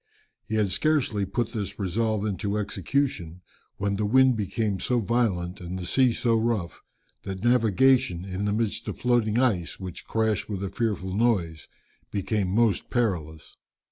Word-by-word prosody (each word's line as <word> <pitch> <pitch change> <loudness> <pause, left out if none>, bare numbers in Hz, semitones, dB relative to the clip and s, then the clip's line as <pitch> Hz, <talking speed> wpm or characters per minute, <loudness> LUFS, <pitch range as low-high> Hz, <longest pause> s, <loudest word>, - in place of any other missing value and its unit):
He 110 - -2
had 105 -2 +2
scarcely 115 -4 +1
put 115 +3 -1
this 105 -4 -4
resolve 110 +2 -1
into 100 0 -2
execution 100 - -2 0.4
when 100 0 -1
the 105 - 0
wind 130 +2 +5
became 105 -1 -1
so 125 +4 +1
violent, 100 -6 0
and 90 +1 -5
the 90 - -5
sea 130 +6 +3
so 115 0 +1
rough, 110 -6 -1 0.4
that 95 0 -6
navigation, 120 -5 +3
in 95 +1 -3
the 105 - +1
midst 110 0 -1
of - - -4
floating 120 -3 +1
ice, 110 -10 +1
which 95 -2 -7
crashed 110 -3 0
with 100 -2 -3
a 100 - -2
fearful 100 -5 -2
noise, 95 -8 0 0.4
became 100 0 -1
most 110 +2 +1
perilous. 85 -10 -2
105 Hz, 155 wpm, -26 LUFS, 95-115 Hz, 0.4 s, wind